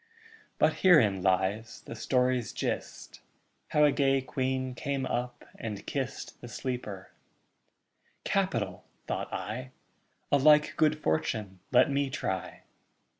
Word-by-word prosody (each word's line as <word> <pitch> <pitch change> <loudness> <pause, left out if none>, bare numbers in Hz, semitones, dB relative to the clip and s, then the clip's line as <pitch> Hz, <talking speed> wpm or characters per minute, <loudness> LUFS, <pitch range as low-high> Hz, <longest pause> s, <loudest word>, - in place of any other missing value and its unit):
But - - +3
herein 115 - +5
lies 95 +4 0
the - - -7
story's 125 -2 +1
gist, - - -4 0.5
How 150 - +3
a 145 - +6
gay 135 -1 +3
queen 130 0 -2
came 135 +1 -2
up 125 -1 -3
and 105 -3 -5
kist 135 -3 -4
The 120 - -8
sleeper. 115 -5 -5 1.1
'Capital!' - - -1 0.2
thought - - -3
I. 125 +4 -4 0.6
'A 145 - +6
like 150 +1 +5
good 155 -2 +3
fortune 95 +4 -1
let 130 +2 +5
me 140 0 +1
try.' 95 -7 -4
125 Hz, 120 wpm, -29 LUFS, 110-135 Hz, 1.1 s, a